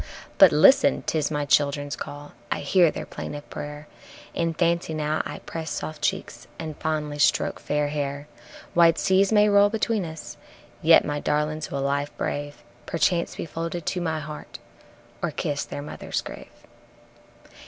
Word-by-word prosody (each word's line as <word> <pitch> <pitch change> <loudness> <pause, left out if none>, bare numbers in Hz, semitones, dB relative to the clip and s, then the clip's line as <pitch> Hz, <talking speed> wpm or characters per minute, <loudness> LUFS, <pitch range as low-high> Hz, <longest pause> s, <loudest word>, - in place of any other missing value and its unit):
But - - +9
listen! 65 - +5
'tis 155 -2 0
my 150 -1 -1
childrens' 145 0 +1
call, 145 0 -8 0.2
I - - -1
hear 170 +4 +4
their - - -5
plaintive 145 0 -7
prayer, 150 +1 -7 0.5
In 165 -1 -1
fancy 170 -1 +1
now 155 0 0
I - - -6
press 160 -1 -5
soft 155 - -5
cheeks - - -2
and 155 -2 -6
fondly 150 -2 -2
stroke - - +2
fair 145 0 -1
hair. 145 0 -3 0.5
Wide 170 -1 +5
seas 190 +2 +3
may 210 -1 +5
roll 205 0 +5
between 220 -1 0
us, 160 -2 -8 0.4
yet - - +6
my 145 0 -2
darlings 150 +1 -1
will 140 -1 -2
life 140 +1 -1
brave, 145 -1 -4 0.2
Perchance 170 +1 +1
be - - -4
folded 165 +1 -5
to 180 - -1
my 160 -2 -1
heart, 150 0 -8 0.6
or - - 0
kiss 145 0 -2
their 145 - -6
mother's 150 - -4
grave. - - -9
155 Hz, 155 wpm, -25 LUFS, 145-170 Hz, 0.6 s, But